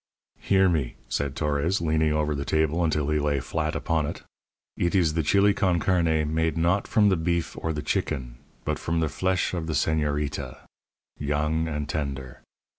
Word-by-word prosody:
"Hear 95 -1 +3
me," 80 -8 0
said 70 -1 -2
Torres, 75 +5 0
leaning 80 -1 +1
over 75 0 +1
the 70 -1 -3
table 80 +4 +1
until 75 -3 +1
he 75 - +2
lay 75 -1 +1
flat 75 +3 -2
upon 80 -3 0
it; - - -6 0.5
"eet 85 +2 0
is 85 -5 +3
the 80 - +1
chili 100 +6 +4
con 90 -3 +1
carne 80 -4 +1
made 80 -1 +1
not 85 +4 +1
from 105 -2 +4
the 95 - +3
beef 85 0 -1
or 80 - -1
the 75 -1 -4
chicken, 60 -4 -2 0.3
but - - -1
from 85 0 -1
the 80 -2 +1
flesh 95 +5 0
of 85 -3 -3
the 80 - -2
señorita 75 -4 -1 0.6
young 75 +3 0
and 75 -2 -3
tender. 70 -3 -4
80 Hz, 180 wpm, -26 LUFS, 75-85 Hz, 0.6 s, chili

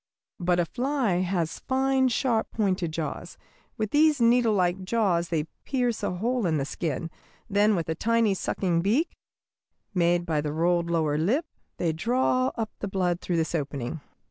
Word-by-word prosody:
But 180 0 +1
a 175 - +2
fly 255 - 0
has 175 -3 -1
fine, 265 0 +2
sharp 235 -2 0
pointed 190 -6 0
jaws. 160 0 -5 0.4
With 215 -2 -2
these 300 -1 +4
needlelike 215 -6 +3
jaws 185 -5 +1
they 160 -3 0 0.2
pierce 245 -4 -1
a 200 -3 -2
hole 235 +2 0
in 160 -2 +1
the 135 - -1
skin, 165 +2 -3 0.4
then 210 0 +3
with 170 -3 -2
a 160 - 0
tiny 230 +4 +2
sucking 180 -2 0
beak, 235 - +1 0.8
made 175 -1 +2
by 155 -3 0
the 150 0 -3
rolled 170 +1 +1
lower 155 -3 +1
lip, 245 - +1 0.3
they 165 -2 0
draw 255 +7 +1
up 225 -2 -3
the 205 - -3
blood 180 -2 0
through 175 - -1
this 160 0 -1
opening." 140 -1 -3
185 Hz, 165 wpm, -26 LUFS, 170-230 Hz, 0.8 s, these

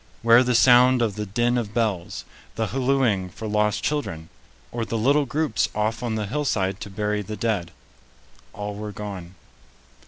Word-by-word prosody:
Where 115 +2 +7
the 125 -1 +1
sound 125 +1 +6
of 110 -3 0
the 105 +1 -5
din 120 +5 +1
of 110 -3 -6
bells? 105 -7 -1 0.3
The 115 - 0
hallooing 125 -7 +1
for 110 +5 -7
lost 105 0 0
children? 80 - -3 0.4
Or 120 -1 -3
the 115 0 -3
little 140 +5 +2
groups 150 -4 0
off 110 +2 -1
on 120 -3 -2
the 105 -1 -2
hillside 100 -6 -1
to - - -7
bury 105 +1 -2
the 105 +2 -6
dead? 100 -5 -1 0.8
All 105 0 -5
were 105 +1 -6
gone. 95 -4 -7
110 Hz, 165 wpm, -24 LUFS, 105-120 Hz, 0.8 s, Where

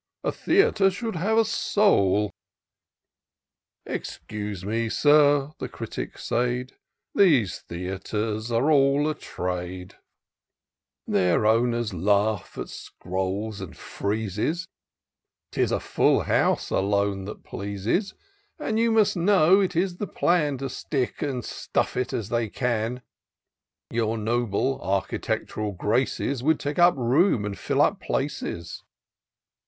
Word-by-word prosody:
A - - 0
theatre 270 - +3
should 220 +3 -4
have 210 +7 +1
a 225 - +5
soul." 105 - +2 1.5
Excuse 105 -3 -5
me. 115 +2 -1
Sir," 145 +1 +4
the - - -4
Critic - - -6
said, 125 +1 -1 0.2
" - - -52
^ese 145 - +4
theatres 105 +5 -4
are 120 +7 +2
all 140 0 +4
a 155 - +1
trade: 90 -6 -5 1.1
Their 90 +2 +2
owners 115 0 +2
laugh 100 +3 +1
at - - -4
scrolls 95 +3 -4
and - - -8 0.2
Mezes; 110 - -1 0.9
'Tis - - 0
a - - +1
full - - +2
house, - - +1
alone, 100 0 +1
that 105 - -8
pleases; 100 - -2 0.4
And 225 -8 -1
you 230 0 +3
must 220 -2 +3
know, 185 0 +5
it 185 -3 0
is 175 +1 0
the 205 - -3
plan 150 -7 +1
To 135 +1 -4
stick 130 -2 -3
and 130 -5 -2
stuff - - -2
it 125 0 -1
as 110 -2 -3
they 115 -2 0
can: 120 +1 -2 0.9
Your 115 -1 0
noble, 120 +3 0
architect'ral 100 +2 -2
graces. 125 +5 0
Would 155 +3 +2
take 145 +4 -3
up 175 0 +6
room, 125 - +3
and 100 -1 -3
fill - - +1
up - - +1
places." 85 0 -3
120 Hz, 125 wpm, -25 LUFS, 100-155 Hz, 1.5 s, up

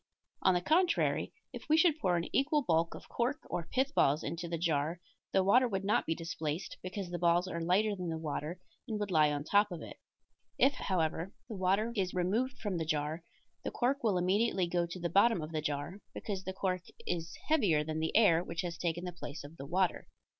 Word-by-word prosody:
On 185 - +4
the 175 - +1
contrary, 345 - +2 0.2
if - - -9
we 310 - +5
should 320 -2 +4
pour 180 -9 +2
an 170 - -2
equal 295 +2 +3
bulk 165 -5 +1
of - - -11
cork 260 +6 -1
or 170 -2 -3
pith 270 +3 +1
balls 145 - +3
into 170 +1 -4
the 170 0 -2
jar 160 0 0 0.3
the 190 - +3
water 250 +7 +5
would 195 -3 -2
not 205 - +2
be 165 - +1
displaced, 165 0 -4
because 185 0 -5
the 175 - -3
balls 175 +1 +3
are 170 -2 -3
lighter 200 +5 +2
than 180 -3 -4
the 160 - -2
water 160 +2 -4 0.3
and 220 -3 -2
would 205 -2 -2
lie 155 -3 +5
on 145 -1 -2
top 205 +5 +3
of 175 - -6
it; - - -9 0.6
if, 275 - +5
however, 170 - -1
the 225 - -6
water 195 +5 +1
is 185 -4 -1
removed 215 +9 0
from 205 -5 -2
the - - 0
jar, 155 +1 -1 0.4
the - - -2
cork 265 +3 0
will 210 -5 +2
immediately 190 +1 +2
go 170 0 0
to 170 +2 -7
the 170 - -1
bottom 200 +4 +4
of 155 0 -5
the 155 -1 -1
jar, 145 +7 -3 0.2
because 195 -4 -4
the 190 - -2
cork 185 -1 -1 0.2
is 165 -2 -3
heavier 200 - +3
than 155 +1 -3
the 160 +5 +1
air 175 -7 +5
which 170 -1 -3
has 175 -2 -5
taken 175 0 -1
the 180 - -5
place 155 -3 -7
of 150 +3 -11
the 135 - -7
water. 185 +3 0
180 Hz, 220 wpm, -32 LUFS, 165-205 Hz, 0.6 s, we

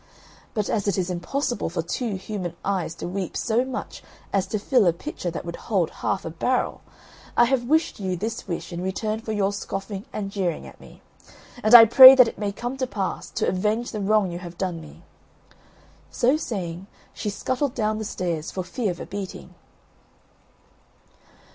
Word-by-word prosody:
But 210 -2 0
as 210 -2 -1
it 200 - +1
is 185 -1 -1
impossible 240 - -2
for 170 0 -3
two 215 +5 -3
human 185 -3 -5
eyes 185 -4 -1
to - - -6
weep 185 0 -4
so 235 +1 +1
much 260 0 -6 0.3
as 195 -1 +1
to 215 - -2
fill 220 0 +3
a 170 - +4
pitcher 180 - -5
that 170 - -6
would 170 0 -6
hold 190 -7 +1
half 195 - -2
a 165 - -4
barrel, 250 +10 -1 0.6
I 240 - +7
have 245 -1 0
wished 315 +1 +1
you 190 -2 -2
this 215 +5 -4
wish 175 0 -5
in 170 - -4
return 215 +4 -2
for 220 -1 -6
your 205 -1 0
scoffing 195 0 -5
and 200 -2 -4
jeering 185 -5 -2
at - - -13
me. - - -16 0.6
And 215 +2 +6
I 230 -1 +12
pray 260 +4 +11
that 255 -3 +7
it - - -7
may 205 -1 -1
come 240 +6 -5
to 260 -1 -1
pass, 195 -5 -4
to - - -1
avenge 210 +5 0
the 215 - -4
wrong 200 -2 +2
you 170 - -5
have 175 -1 -10
done 175 -3 -3
me." 155 - -14 1.1
So 255 +4 +2
saying, 190 - -4 0.3
she 210 - -4
scuttled 255 +6 -2
down 215 -2 0
the - - -3
stairs, 175 -6 -3
for 185 - -4
fear 220 +3 -2
of 175 -1 -4
a - - -6
beating. 200 -1 -7
200 Hz, 190 wpm, -24 LUFS, 180-230 Hz, 1.1 s, I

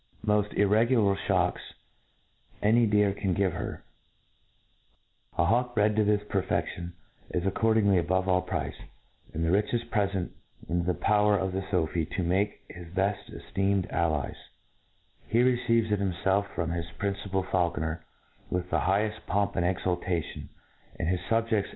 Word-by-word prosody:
rooft 105 -1 +1
irrie^ulv 105 0 +4
ifeapks - - 0 0.9
any 115 +3 +4
deer 105 -1 +3
can 95 -2 -1
give 95 -3 +1
heir, 85 - -5 1.5
4 85 - +2
Jiawk 120 +4 +1
bred 105 0 +3
tg 110 -1 +3
this 105 -1 +3
perfeftipn 90 -2 -1 0.4
is 90 0 -1
accordingly 100 0 +3
a^ 85 - +2
Jjove 95 +1 +1
all 90 -1 +3
price, 90 - -3 0.6
and 80 +1 -2
the - - +1
richcft 115 +4 0
prefetit 100 -4 0 0.4
in 85 0 0
the 90 - +1
power 105 -1 +3
pf 95 0 -1
the 95 +1 -2
Sophi 85 -3 0
to 95 - 0
make 95 +4 -1
to - - -10
hi^ 85 -1 -10
beil 100 +2 +2 0.2
eftcemcd 100 -1 -1
allies* 80 -4 0 0.9
He 115 - +3
receives 115 -3 +2
itjbiinfelf 100 0 +1
from 85 0 -1
his 85 -1 -2
principal 100 -1 -2
faulconer 85 -3 -1 0.5
with 90 0 -2
the - - +2
higheft 105 +3 0
pomp 100 0 0
and 85 - +1
c^^ultation, 90 -2 -2 0.5
and - - -2
his 90 0 +1
fubjeds 115 -3 +1
100 Hz, 145 wpm, -28 LUFS, 90-105 Hz, 1.5 s, irrie^ulv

